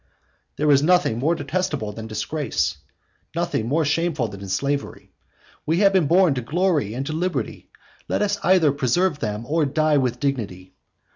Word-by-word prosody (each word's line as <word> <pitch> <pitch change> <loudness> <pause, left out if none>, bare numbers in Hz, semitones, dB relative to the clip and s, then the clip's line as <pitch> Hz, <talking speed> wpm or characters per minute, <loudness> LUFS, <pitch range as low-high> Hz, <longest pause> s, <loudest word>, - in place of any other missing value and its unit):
There 150 0 +2
is 140 -1 +5
nothing 175 -8 +2
more 160 +7 +1
detestable 150 - -2
than 110 +1 -8
disgrace; 135 +5 -2 0.6
nothing 110 - -1
more 155 +5 +1
shameful 150 -5 0
than 100 -1 -9
slavery. 140 +8 -3 0.5
We 165 +5 +1
have 200 -1 +5
been 180 -6 +3
born 175 -1 +4
to 130 - -3
glory 150 - 0
and 135 +2 -3
to 155 - -4
liberty; 175 +3 -3 0.4
let - - 0
us 205 0 0
either 175 -5 +4
preserve 145 +5 +1
them 105 -1 -3
or 160 +4 +1
die 155 +1 +2
with 125 -2 -1
dignity. 105 -10 -3
145 Hz, 160 wpm, -23 LUFS, 120-170 Hz, 0.6 s, is